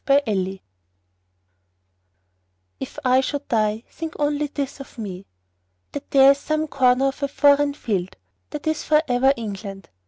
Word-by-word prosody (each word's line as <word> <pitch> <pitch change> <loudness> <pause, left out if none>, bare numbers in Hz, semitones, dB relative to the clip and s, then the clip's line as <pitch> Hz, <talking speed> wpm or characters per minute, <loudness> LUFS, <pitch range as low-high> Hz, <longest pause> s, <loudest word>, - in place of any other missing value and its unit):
The 280 +1 +4
Soldier 195 -3 -1 2.2
If - - -7
I 255 +1 +4
should 285 +2 -4
die, 215 -1 0
think 325 -1 -7
only 295 0 0
this 280 -1 -5
of 275 - -11
me: 195 -4 -7 0.6
That 285 - -7
there's 275 0 +6
some 310 +2 -1
corner 260 0 +3
of 270 - -9
a 280 - +1
foreign 285 +1 +3
field 190 -7 -3 0.3
That 300 0 -7
is 315 -1 -1
for 305 0 +3
ever 250 +2 +3
England. 195 -4 -7
270 Hz, 145 wpm, -22 LUFS, 215-285 Hz, 2.2 s, there's